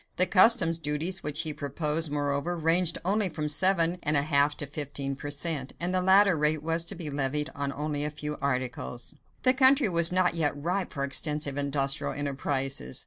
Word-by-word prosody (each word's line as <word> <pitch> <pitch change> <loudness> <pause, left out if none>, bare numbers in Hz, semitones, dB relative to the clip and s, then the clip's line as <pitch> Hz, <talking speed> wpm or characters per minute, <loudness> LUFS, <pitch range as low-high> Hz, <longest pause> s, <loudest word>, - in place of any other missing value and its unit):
The 180 - +4
customs 185 -4 +5
duties 160 +5 -2
which 150 0 -1
he 155 - -4
proposed, 150 +2 -2
moreover, 145 +4 -2
ranged 165 +1 +2
only 200 +1 +1
from 155 -2 -4
seven 175 +2 +3
and 150 0 +2
a 140 - +3
half 145 -1 +3
to 145 - -4
fifteen 140 -1 -4
per 145 +2 -7
cent., 145 -2 -4
and 175 +2 -2
the 185 - +1
latter 190 0 +4
rate 150 0 0
was 165 +1 0
to - - -4
be 160 -4 -6
levied 145 +2 -2
on 140 -2 -3
only 145 0 -3
a 150 - 0
few 150 0 -6
articles. 125 -2 -3 0.3
The 255 - +5
country 265 -2 +4
was 170 -1 -1
not 180 -1 +2
yet 150 -4 -1
ripe 180 +5 -2
for 140 - -4
extensive 145 +1 +1
industrial 140 -1 -1
enterprises. 135 - -2
150 Hz, 190 wpm, -27 LUFS, 145-175 Hz, 0.3 s, customs